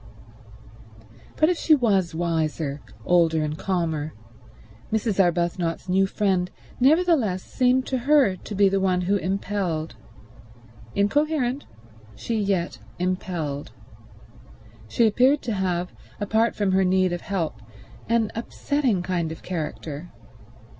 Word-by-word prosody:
But 310 - +4
if 360 - 0
she 315 - +5
was 195 - +1
wiser, 160 -4 -1 0.2
older 165 -3 +3
and 150 0 -2
calmer, 160 -4 -2 0.8
Mrs. 220 -2 0
Arbuthnot's 175 0 -1
new 190 +1 +3
friend 190 -3 0 0.3
nevertheless 270 - +3
seemed 255 0 +2
to 260 - -1
her 270 -6 +4
to 205 - -8
be 200 0 +5
the 195 0 +1
one 185 -1 +1
who 195 +3 +1
impelled. 185 -4 -2 1.0
Incoherent, 275 +4 +1 0.5
she 230 - -3
yet 195 -4 -1 0.2
impelled. 175 -5 -3 1.1
She 230 - +2
appeared 255 +6 +3
to 230 - -2
have, 180 -2 -1 0.3
apart 220 +3 +1
from 205 -2 +1
her 190 +1 +3
need 185 -1 +2
of 175 - -3
help, 165 - -3 0.5
an 230 -2 +2
upsetting 240 -3 -1
kind 175 -3 -1
of 160 - -9
character. 160 -1 -5
190 Hz, 120 wpm, -24 LUFS, 170-230 Hz, 1.1 s, she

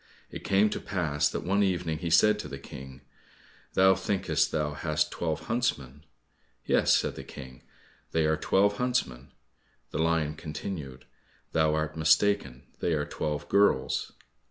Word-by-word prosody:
It - - -8
came 100 +2 +3
to - - -3
pass 75 -6 0
that - - -4
one 100 +4 +1
evening 90 -5 0
he 85 - -3
said 105 +6 +5
to - - -5
the - - -7
King, 65 0 -11 0.7
"Thou 95 0 +6
thinkest 85 -7 0
thou 75 -2 -1
hast 75 0 -1
twelve 80 -2 -2
huntsmen?" 80 - -2 0.6
"Yes," - - +4
said - - -1
the - - -8
King, 65 -3 -11 0.5
"they 80 -1 +2
are 80 0 +3
twelve 100 +6 +2
huntsmen." 75 - -2 0.6
The - - -3
lion 80 -2 +1
continued, 75 -4 -7 0.5
"Thou 80 -1 +2
art 75 0 -2
mistaken, 80 -3 +2 0.2
they 85 - 0
are 75 -2 0
twelve 75 -1 -4
girls." 100 +1 +2
80 Hz, 150 wpm, -28 LUFS, 75-95 Hz, 0.7 s, Thou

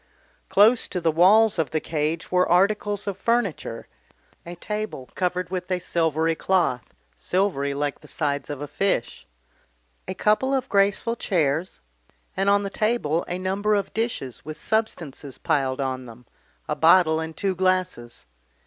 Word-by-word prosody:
Close 220 +4 +5
to 180 - -3
the 165 -2 +1
walls 195 +5 +5
of 160 - 0
the 155 - -1
cage 155 +1 -3
were 180 0 +2
articles 205 +2 +2
of 200 -2 -4
furniture, 205 - -1 0.6
a 175 - -7
table 210 -8 -5
covered 180 -1 -2
with 180 -1 -4
a 185 - +2
silvery 165 -2 0
cloth, 165 - 0 0.2
silvery 140 - -1
like 145 0 -2
the 150 - -16
side 140 -1 -2
of 145 -1 -5
a 145 - -4
fish, 190 -8 -2 0.8
a 185 - -4
couple 240 +8 +2
of 265 -1 -1
graceful 200 +4 +2
chairs, 165 - -1 0.5
and 195 +1 +1
on 200 0 +3
the 200 - -4
table 215 -9 0
a 175 - -3
number 195 +3 0
of 200 - -2
dishes 220 - -3
with 155 +1 -7
substances 160 - -3
piled 135 -2 0
on 130 -2 -3
them, 120 +1 -13 0.4
a - - -1
bottle 160 -1 +5
and 160 0 -6
two 195 -1 0
glasses. 185 -10 -1
180 Hz, 155 wpm, -24 LUFS, 150-200 Hz, 0.8 s, Close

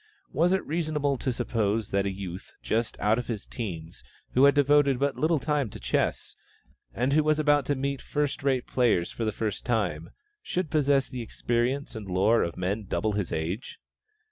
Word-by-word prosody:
Was 170 +3 +3
it 190 - +1
reasonable 150 -3 0
to 130 - -1
suppose 115 -3 -1
that 100 0 +1
a - - -1
youth, 95 -1 -7
just 115 +1 -1
out 110 +3 +2
of 125 - -5
his 110 -4 -4
teens, 85 -8 -6 0.3
who 130 +2 +5
had 140 - +6
devoted 145 -1 +4
but 140 +1 0
little 160 +1 +2
time 145 -3 0
to - - -9
chess, - - -1 0.6
and 125 +4 0
who 155 +1 +4
was 155 0 +2
about 145 -2 +3
to 145 - +1
meet 140 0 -2
first 145 -1 -2
rate 135 -2 +1
players 115 -9 +1
for 115 - -3
the 110 - +1
first 105 -1 -3
time, 90 -9 -1 0.3
should 185 - -3
possess 140 -3 +3
the 125 -2 -6
experience 120 +4 -1
and 110 -3 -6
lore 95 +5 +3
of 85 - -2
men 100 +4 -2
double 95 +4 -1
his 100 -3 -2
age? 85 +8 -3
125 Hz, 190 wpm, -27 LUFS, 105-145 Hz, 0.6 s, had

